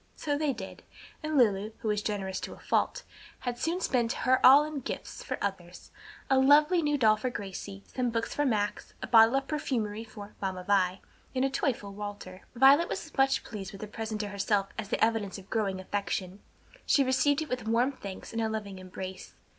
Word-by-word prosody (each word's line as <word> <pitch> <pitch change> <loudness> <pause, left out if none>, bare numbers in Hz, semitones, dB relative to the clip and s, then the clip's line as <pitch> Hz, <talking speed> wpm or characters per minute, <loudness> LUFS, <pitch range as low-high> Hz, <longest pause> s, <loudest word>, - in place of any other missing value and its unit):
So 290 -1 -1
they 295 -1 +1
did; 200 -7 -8 0.4
and 310 -1 -1
Lulu, 215 -3 +3
who 220 - -3
was 210 -1 +1
generous 195 -3 -3
to - - -6
a - - -17
fault, - - 0 0.4
had 245 -1 -3
soon 340 +6 -1
spent 240 -8 +1
her 260 0 +3
all 275 +3 +9
in 305 -1 -4
gifts 275 - -6
for - - -3
others; - - -5 0.4
a 265 -1 +4
lovely 295 +6 +5
new 295 -1 +1
doll 215 -4 +4
for 250 +4 -2
Gracie, 200 -2 -7
some 250 -2 -2
books 230 0 -2
for 290 - 0
Max, 210 -6 -1
a - - 0
bottle 225 +1 +6
of 270 0 0
perfumery 225 -8 -2
for 210 -2 -11
"Mamma 190 -2 -3
Vi," 190 -1 +2 0.3
and 260 +1 +2
a 270 - 0
toy 270 - +1
for 205 -4 -9
Walter. 200 -2 -7
Violet 275 +7 +6
was 315 - -5
much 270 0 +3
pleased 200 -4 -7
with 195 - -10
the - - -3
present 220 0 -5
to 205 - -4
herself 200 0 0
as 215 -2 -6
an - - +2
evidence 220 -3 0
of 195 -1 -14
growing 200 -4 0
affection. 190 0 -3 0.5
She 280 - +5
received 280 +3 +2
it 310 - -10
with 250 -3 -3
warm 235 +4 +2
thanks 200 -8 -9
and 230 - -1
a 220 - 0
loving 205 -3 -5
embrace. 185 0 -8
225 Hz, 205 wpm, -29 LUFS, 200-270 Hz, 0.5 s, all